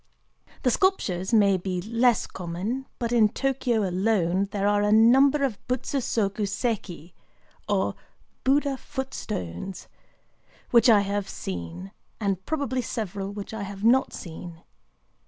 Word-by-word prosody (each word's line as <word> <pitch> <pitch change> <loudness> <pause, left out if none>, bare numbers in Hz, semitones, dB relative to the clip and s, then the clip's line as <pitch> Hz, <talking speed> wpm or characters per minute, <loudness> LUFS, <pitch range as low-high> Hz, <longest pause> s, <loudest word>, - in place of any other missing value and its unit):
The 250 - +3
sculptures 195 - +1
may 200 -4 +5
be 185 0 -3
less 230 +4 +2
common; 190 +9 -4
but 235 -2 -2
in 225 -3 +5
Tōkyō 245 -5 0
alone 185 -1 +1
there 200 0 -1
are 205 0 +3
a 205 0 +2
number 265 +6 +5
of 240 -7 -1
Butsu 255 +2 -1
soku 210 -4 -1
séki, 195 -6 -3 0.6
or - - +1 0.5
"Buddha 275 0 +2
foot 265 0 -6
stones," 90 - -5 0.8
which 240 +1 +6
I 210 -3 +7
have 200 0 -2
seen,—and 95 - -5
probably 280 -5 -1
several 200 -4 -4
which 205 +1 -7
I 220 - -4
have 200 0 -7
not 250 +4 +4
seen. 170 0 -9
210 Hz, 130 wpm, -26 LUFS, 190-250 Hz, 0.8 s, I